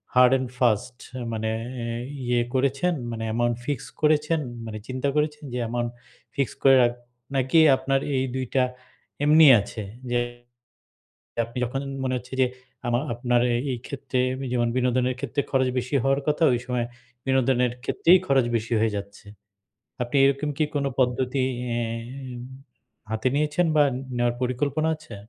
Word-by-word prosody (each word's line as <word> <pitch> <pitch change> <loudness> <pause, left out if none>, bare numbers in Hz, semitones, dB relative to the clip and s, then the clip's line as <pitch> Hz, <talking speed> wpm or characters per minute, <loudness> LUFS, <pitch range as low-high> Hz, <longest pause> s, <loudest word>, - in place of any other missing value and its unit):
hard 125 0 +7
and 130 -1 -4
fast 120 0 +1 0.2
এ - - -5
মানে 110 0 -2 0.3
এ - - -3 0.4
ইয়ে 120 0 +2
করেছেন 140 +7 +1 0.2
মানে 115 -1 -4
অ্যামাউন্ট 120 +1 0
ফিক্স 145 -3 -2 0.2
করেছেন, 155 +1 +3 0.3
মানে 110 -1 -6
চিন্তা 130 +2 -1
করেছেন 150 0 0
যে 125 - -2
অ্যামাউন্ট 120 +1 -2 0.4
ফিক্সড 135 -6 -1
করে 135 -1 +7
রাখ 120 0 +2 0.4
নাকি 135 +4 +3 0.2
আপনার 135 +1 +1 0.2
এই 130 - +1
২ 130 0 -1
টা 130 - +5 0.6
এমনি 155 +2 +7 0.2
আছে? 105 +2 -6 0.3
যে 120 - +2 1.3
আপনি 115 +2 -14
যখন 125 +3 -3 0.2
মনে 130 0 0
হচ্ছে 125 +1 -10
যে, - - +5 0.4
আমার 120 +1 +1
আপনার 120 0 +1
এ - - +2 0.2
এইক্ষেত্রে 130 +2 -3 0.3
যেমন 120 -1 +1
বিনোদনের 125 0 +1
ক্ষেত্রে 140 +1 -1
খরচ 130 -1 +2
বেশি 125 +3 -3
হওয়ার 135 +1 +2
কথা, 150 +2 +2
ওই 120 - 0
সময় 125 -2 -1 0.4
বিনোদনের 130 -2 +2
ক্ষেত্রেই 175 +6 +5
খরচ 135 -3 +3
বেশি 115 +1 -4
হয়ে 110 -1 +1
যাচ্ছে। 100 0 -8 0.8
আপনি 125 +4 -2
এরকম 140 +2 +1
কি 155 - +2
কোন 140 -1 +1
পদ্ধতি 130 +1 +1 0.4
এম 120 +2 -5 0.7
হাতে 110 +3 -1
নিয়েছেন 150 +4 +1
বা, 150 - +6 0.3
নেওয়ার 120 0 +1
পরিকল্পনা 140 +5 0
আছে? 155 -8 -11
130 Hz, 150 wpm, -25 LUFS, 120-140 Hz, 1.3 s, hard